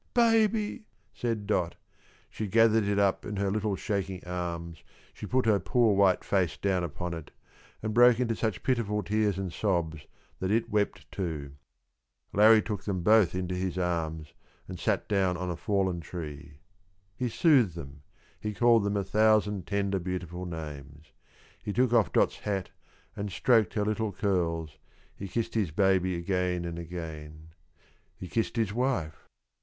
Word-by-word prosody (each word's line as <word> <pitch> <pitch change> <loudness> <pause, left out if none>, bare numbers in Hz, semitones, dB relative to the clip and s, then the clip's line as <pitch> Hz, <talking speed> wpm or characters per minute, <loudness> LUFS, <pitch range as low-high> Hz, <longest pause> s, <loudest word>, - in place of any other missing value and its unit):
"Baby!" 225 - +2 0.3
said 115 -4 -2
Dot. 90 -5 0 0.6
She 110 - -4
gathered 115 +1 +4
it 100 0 0
up 100 -1 +2
in 105 - -5
her 100 0 0
little 105 -1 -1
shaking 95 -2 -3
arms, 85 -2 -5 0.3
she - - -8
put 130 -1 +1
her 105 -3 +4
poor 115 +2 +2
white 95 -2 +3
face 90 -7 0
down 95 -3 0
upon 85 +2 -4
it, 80 -2 -7 0.5
and 110 0 -2
broke 120 +1 +6
into 115 -3 0
such 110 -4 -2
pitiful 105 -5 0
tears 105 0 +1
and 95 -3 -4
sobs 80 -6 -1 0.3
that 95 - -2
it 115 +2 +1
wept 105 -1 -1
too. 80 -7 -4 0.8
Larrie 110 +2 +6
took 105 -4 -4
them 95 -4 -2
both 105 -3 +5
into 90 0 -2
his 90 0 -2
arms, 80 -4 -2 0.3
and - - -7
sat - - 0
down 95 -3 +1
on 90 0 -3
a - - -3
fallen 95 -2 0
tree. 75 -3 -8 0.6
He 125 +4 -2
soothed 125 - +3
them, 70 -3 -9 0.4
he 105 -1 -4
called 120 -2 +4
them 100 0 0
a 100 - 0
thousand 105 -2 +2
tender, 100 -1 0
beautiful 90 0 -5
names; 75 -2 -8 0.5
he 105 - -4
took 125 +2 +2
off 110 -7 +3
Dot's - - +2
hat 95 -3 -3 0.4
and 100 0 -4
stroked 110 +1 +2
her 105 -1 +1
little 110 0 -1
curls, 85 -6 -1 0.4
he 100 - -6
kissed 115 +4 -2
his 105 -6 0
baby 95 +1 +2
again 90 0 -1
and 85 0 -5
again; 80 -2 -8 0.7
he 90 - -7
kissed 115 +6 -1
his 110 -4 0
wife. 110 -11 -2
95 Hz, 160 wpm, -29 LUFS, 85-110 Hz, 0.8 s, broke